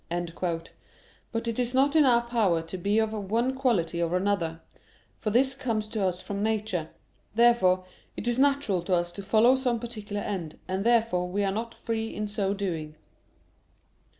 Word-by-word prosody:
But 230 0 -3
it 230 +1 -2
is 245 +1 -1
not 280 +3 +3
in 310 -2 +6
our 235 -2 +4
power 215 -9 +1
to 165 - -7
be 200 +4 +1
of 220 -1 +1
one 220 +5 0
quality 200 -11 0
or 170 +1 +1
another; 180 -4 -1 0.6
for 215 - -1
this 260 +5 +3
comes 225 -5 -2
to 215 -2 -2
us 180 -1 -1
from 200 0 -4
nature. 210 -7 -1 0.5
Therefore 220 -6 +4 0.3
it 235 - -4
is 240 +1 +1
natural 275 -9 +2
to 185 - +2
us 175 0 0
to 185 - -7
follow 220 +5 +4
some 250 -3 0
particular 215 -3 -5
end, 170 -6 -4
and 190 +1 -1
therefore 225 -6 +2
we 200 +3 0
are 195 - +1
not 225 +3 -4
free 225 -1 -3
in 210 0 -2
so 205 -2 -1
doing. 165 -6 -4
215 Hz, 175 wpm, -27 LUFS, 185-235 Hz, 0.6 s, in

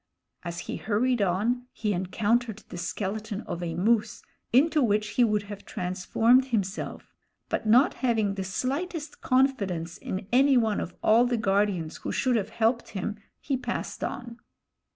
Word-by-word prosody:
As 170 0 -5
he - - -5
hurried 230 +3 +1
on 220 +7 0
he 210 -2 -1
encountered 215 +5 0
the - - -7
skeleton 205 +4 -3
of 175 - -5
a 165 -2 -3
moose, 215 +4 +1 0.3
into 300 +5 +4
which 210 -3 +2
he 245 - +2
would 210 -3 +2
have 205 0 -9
transformed 225 +8 +2
himself; 215 -6 -3 0.4
but 225 - -2
not 245 +6 +5
having 225 -6 +2
the 195 -1 -3
slightest 290 - -3
confidence 200 -11 +1
in 190 +1 -5
any 265 +2 +5
one 220 -3 +2
of 175 - -5
all 235 +3 +5
the 245 -1 0
guardians 195 -6 0
who - - -5
should 255 -2 +1
have 210 -4 0
helped 230 +1 0
him, 210 +3 -3 0.2
he 280 - -1
passed 260 - -4
on. 240 -2 -5
220 Hz, 155 wpm, -27 LUFS, 195-245 Hz, 0.4 s, not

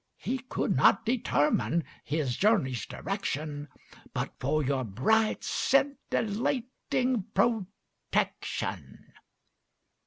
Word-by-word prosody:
He 260 +1 -2
could 255 - -1
not 215 - +5
determine 170 - +2 0.2
his 145 -5 -1
journey's 170 - +2
direction 150 -7 -3 0.5
But - - -2
for 155 0 +1
your 135 -1 0
bright 215 - +2
scintillating 255 -2 0
protection. 205 -1 -2
200 Hz, 75 wpm, -29 LUFS, 145-240 Hz, 0.5 s, not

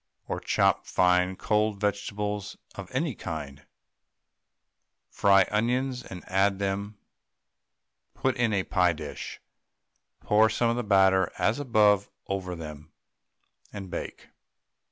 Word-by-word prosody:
Or - - -3
chop - - +1
fine 90 0 +2
cold 105 +1 0
vegetables 105 0 -3 0.2
of 100 - -8
any 135 +2 -1
kind, 75 -7 -7 1.4
fry 100 -1 +4
onions 125 +4 0
and 90 -2 -10
add 95 +2 +2
to - - -11
them, 100 +1 -3 1.2
put 130 -1 0
in 120 -2 +1
a 100 -2 +1
pie 90 -2 +2
dish, - - -7 0.8
pour 110 +1 +4
some 115 +2 +1
of - - -1
the 120 - -2
batter 95 -3 +4
as 110 +6 +1
above 105 -6 +3 0.2
over 95 -2 -3
them, 75 -1 -9 0.8
and 95 -3 -8
bake. - - -6
100 Hz, 120 wpm, -27 LUFS, 95-110 Hz, 1.4 s, fry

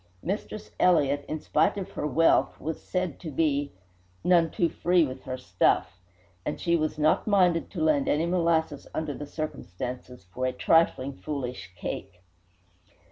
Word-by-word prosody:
Mistress 205 +3 -4
Elliott, 145 -5 +3
in 155 - -3
spite 180 - +1
of 195 - -5
her - - -3
wealth, 160 +4 +3
was 160 +1 -4
said 180 -5 -3
to 165 - -6
be 145 -1 0 0.5
"none 170 -2 +4
too 170 - +1
free 175 0 +2
with 130 -1 -7
her 130 0 -4
stuff," 90 -4 +1 0.4
and 150 - -3
she 170 -1 +2
was 155 -2 -1
not 155 +6 +2
minded 180 -5 +3
to 165 -5 -3
lend 150 -3 +2
any 155 +3 +2
molasses 165 -4 0
under 155 -2 -2
the 145 +1 -7
circumstances, 125 - -6
for 130 +3 -1
"a 130 - -2
trifling 140 -1 +2
foolish" 125 -3 -5
cake. 90 0 -6
155 Hz, 155 wpm, -27 LUFS, 130-170 Hz, 0.5 s, none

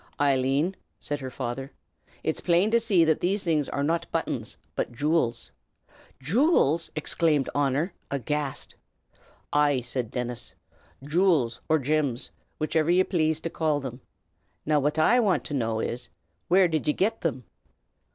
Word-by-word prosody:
"Eileen," 140 +5 +2 0.2
said 145 0 -4
her 130 -1 -5
father, 130 +2 -5 0.5
"'tis 160 - -1
plain 180 +4 +3
to 235 - +5
be - - 0
seen 195 -7 +4
that 160 -1 +2
these 195 +3 0
things 155 -5 +1
are 140 - -2
not 165 +3 -1
buttons, - - -3 0.2
but - - -2
jew'ls." 135 -2 0 0.7
"Jew'ls!" 165 - +2
exclaimed 155 -2 +1
Honor, 145 +5 0 0.2
aghast. 140 +1 -3 0.8
"Ay!" 145 -3 +3
said 125 -1 -3
Dennis; 125 -1 -5 0.5
"jew'ls, 150 -7 +2
or 160 - +5
gims, 140 -3 0 0.3
whichiver 155 +1 +1
ye 180 +2 +5
plaze 160 -4 0
to 165 - -4
call 155 -3 0
thim. 130 -2 -7 0.6
Now, 150 -1 +2
phwhat 150 +3 0
I 235 +10 +5
want 205 -6 +2
to - - -7
know 115 -5 0
is, 120 +2 -4 0.4
where 185 +1 +5
did 160 -3 -2
ye 150 - +3
get 220 +7 0
thim?" 130 -6 -2
150 Hz, 150 wpm, -26 LUFS, 135-170 Hz, 0.8 s, to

